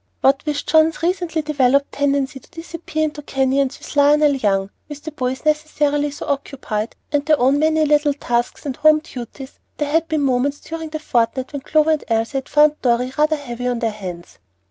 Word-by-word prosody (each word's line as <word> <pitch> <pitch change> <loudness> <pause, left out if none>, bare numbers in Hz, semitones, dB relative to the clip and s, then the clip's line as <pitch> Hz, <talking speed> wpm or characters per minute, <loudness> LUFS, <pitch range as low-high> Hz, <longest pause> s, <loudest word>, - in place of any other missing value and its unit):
What 275 +1 +3
with 290 -1 -2
John's 320 0 +3
recently 345 -2 0
developed 280 -2 +2
tendency 280 -1 0
to - - -23
disappear 330 -2 -5
into 300 -1 -3
canyons 270 -1 0
with - - -10
Lionel 290 +1 +5
Young, 200 -6 0 0.2
with 295 0 -9
the 315 - -6
boys 260 -2 -3
necessarily 300 -1 +1
so 290 - -7
occupied, 260 -6 -3 0.2
and 290 -1 +1
their 305 -1 +3
own 265 +4 +3
many 315 0 +3
little 295 -1 +2
tasks 240 -2 -2
and 270 -3 -3
home 310 0 +5
duties, 260 +1 -9 0.2
there 295 -1 -2
had 325 +1 +2
been 310 -2 0
moments 275 +1 +1
during 325 -1 -6
the 310 - -4
fortnight 260 -2 -1
when 285 - -4
Clover 310 +3 +2
and 310 - 0
Elsie 225 +4 0
had 265 - -13
found 300 0 +4
Dorry 250 +1 +1
rather 305 +1 +2
heavy 250 -4 -5
on 245 -1 0
their 230 -1 -1
hands. 180 - -9
285 Hz, 190 wpm, -20 LUFS, 255-305 Hz, 0.2 s, Lionel